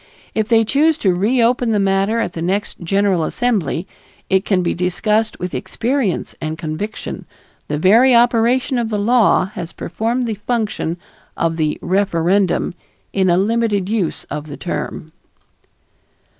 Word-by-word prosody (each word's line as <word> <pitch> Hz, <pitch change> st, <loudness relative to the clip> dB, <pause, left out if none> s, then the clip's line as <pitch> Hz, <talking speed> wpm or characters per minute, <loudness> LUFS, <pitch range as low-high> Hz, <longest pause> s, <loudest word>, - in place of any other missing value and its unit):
If 220 Hz, -1 st, 0 dB
they 225 Hz, -1 st, +4 dB
choose 310 Hz, +6 st, +3 dB
to 190 Hz, -3 st, +2 dB
reopen 235 Hz, +5 st, +2 dB
the 215 Hz, -, +2 dB
matter 195 Hz, +3 st, +1 dB
at 200 Hz, -, -2 dB
the 165 Hz, -, -5 dB
next 190 Hz, +4 st, -2 dB
General 190 Hz, 0 st, +1 dB
Assembly, 195 Hz, -, -1 dB, 0.5 s
it 190 Hz, 0 st, +3 dB
can 185 Hz, -3 st, +1 dB
be 170 Hz, -, 0 dB
discussed 210 Hz, +5 st, 0 dB
with 180 Hz, 0 st, -5 dB
experience 240 Hz, -5 st, -1 dB
and 155 Hz, 0 st, -3 dB
conviction; 165 Hz, +6 st, -5 dB, 0.4 s
the 150 Hz, -, -2 dB
very 230 Hz, -, +5 dB
operation 240 Hz, +2 st, +3 dB
of 230 Hz, -2 st, -1 dB
the 215 Hz, -, -1 dB
law 225 Hz, -2 st, +3 dB
has 175 Hz, -5 st, -6 dB
performed 230 Hz, +8 st, -2 dB
the 225 Hz, -, -2 dB
function 215 Hz, -8 st, -1 dB, 0.4 s
of 165 Hz, -1 st, 0 dB
the 155 Hz, -2 st, 0 dB
"referendum" 185 Hz, -1 st, +1 dB, 0.4 s
in 190 Hz, -2 st, +2 dB
a 175 Hz, -, +4 dB
limited 205 Hz, -1 st, +1 dB
use 210 Hz, -7 st, -1 dB
of 150 Hz, 0 st, -4 dB
the 145 Hz, -, -8 dB
term. 160 Hz, -2 st, -5 dB
200 Hz, 145 wpm, -18 LUFS, 175-230 Hz, 0.5 s, very